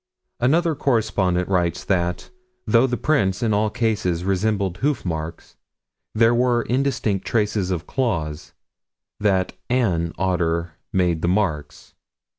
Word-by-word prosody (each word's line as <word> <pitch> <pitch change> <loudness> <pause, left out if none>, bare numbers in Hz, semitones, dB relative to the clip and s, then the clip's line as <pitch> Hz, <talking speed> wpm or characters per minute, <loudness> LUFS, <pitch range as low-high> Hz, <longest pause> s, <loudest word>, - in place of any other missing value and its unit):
Another 160 +7 +2
correspondent 105 -10 +1
writes 90 -2 0
that, 90 -2 -1 0.3
though 120 +3 +4
the 125 -1 -2
prints 105 -7 +1
in 110 -2 +2
all 105 +1 +2
cases 105 -7 -1
resembled 95 -1 0
hoof 135 0 -1
marks, 80 -1 -5 0.6
there 115 +1 +4
were 120 -1 +2
indistinct 120 -6 0
traces 105 -4 0
of 90 -2 -2
claws 85 - -2 0.7
that 95 -3 +1 0.2
"an" 90 -10 +1
otter 85 -3 +1
had 85 - -14 0.2
made 90 -3 +1
the 85 - 0
marks. 85 -6 -2
100 Hz, 125 wpm, -22 LUFS, 90-115 Hz, 0.7 s, though